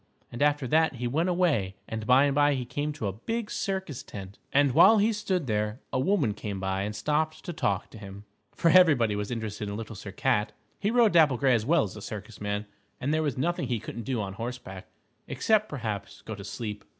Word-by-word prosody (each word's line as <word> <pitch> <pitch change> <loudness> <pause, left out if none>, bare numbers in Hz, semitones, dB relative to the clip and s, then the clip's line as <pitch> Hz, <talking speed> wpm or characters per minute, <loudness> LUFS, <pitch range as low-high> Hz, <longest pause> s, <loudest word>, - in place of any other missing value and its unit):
And 120 - -6
after 145 -2 +2
that 160 +2 +3
he 125 0 -4
went 160 +9 +1
away 150 - +1
and 110 -1 -5
by 130 +2 +6
and 140 - +1
by 145 0 +3
he 125 -2 -3
came 145 +5 -3
to 145 -7 -5
a 100 - -1
big 225 - -4
circus 190 -9 -3
tent. 95 0 -9
And 140 -1 +4
while 170 - +7
he 215 +2 +3
stood 190 -6 -1
there, 105 0 -1
a - - +1
woman 140 - +2
came 100 -1 -5
by 95 0 -1
and 105 +2 -3
stopped 155 +3 -1
to 175 - -4
talk 100 - -1
to 110 - -11
him. 100 0 -10 0.3
For 165 - +3
everybody 145 - +5
was 105 0 -3
interested 110 -3 -4
in 100 - -4
Little 115 0 -7
Sir 100 0 -8
Cat. 115 -6 0 0.3
He 205 - 0
rode 230 -4 +4
Dapple 155 -6 +5
Gray 130 +1 +3
as 115 -2 0
well 165 0 +4
as 100 - -6
a 105 - -8
circus 105 0 -8
man, 105 0 -2 0.3
and 140 +4 -1
there 155 - +2
was 145 -5 -1
nothing 165 0 -1
he 120 -2 -1
couldn't 115 - -7
do 125 +1 -2
on 100 -2 -3
horseback, 115 -4 -7 0.4
except, 215 -1 +1
perhaps, 110 -8 -5
go 110 - -6
to 100 -1 -8
sleep. 105 -1 -6
125 Hz, 225 wpm, -28 LUFS, 105-155 Hz, 0.4 s, while